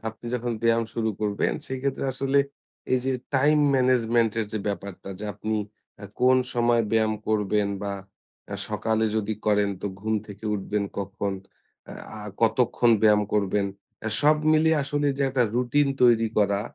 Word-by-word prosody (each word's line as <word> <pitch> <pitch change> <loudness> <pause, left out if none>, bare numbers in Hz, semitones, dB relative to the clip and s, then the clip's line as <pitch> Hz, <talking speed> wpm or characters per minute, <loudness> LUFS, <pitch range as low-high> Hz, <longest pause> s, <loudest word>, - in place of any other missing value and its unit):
আপনি 110 +2 -10
যখন 120 0 -2
ব্যায়াম 115 0 +3
শুরু 110 -1 0
করবেন 105 -1 0
সেক্ষেত্রে 130 +1 -3
আসলে 135 +2 +1 0.5
এই 130 - +4
যে 135 - +1 0.2
টাইম 150 +3 +4 0.2
ম্যানেজমেন্ট 120 -3 +3
এর 110 - -2
যে 110 - -1
ব্যাপারটা 100 -2 -6
যে - - -6
আপনি 110 0 -2 0.6
কোন 130 +1 +5 0.2
সময় 120 0 +3
আ - - -7
ব্যায়াম 110 -1 +2
করবেন 105 -1 +1
বা 100 -1 -2 0.6
আ - - -3
সকালে 110 0 0
যদি 110 0 -1
করেন 105 -1 +3
তো - - -1
ঘুম 110 +1 -1
থেকে 105 +1 -11
উঠবেন 105 +1 -2 0.2
কখন, 100 0 -3 0.9
আ - - -8 0.2
কতক্ষণ 120 +1 +3
ব্যায়াম 105 -1 +5
করবেন। 100 -1 +1 0.4
আ - - +1
সব 150 +1 +5 0.2
মিলিয়ে 155 0 +3
আসলে 145 +1 -1
যে 140 - 0
একটা 130 -2 +2
রুটিন 125 +4 +2
তৈরি 115 -2 +5
করা, 100 -1 +2
110 Hz, 160 wpm, -25 LUFS, 105-130 Hz, 0.9 s, কোন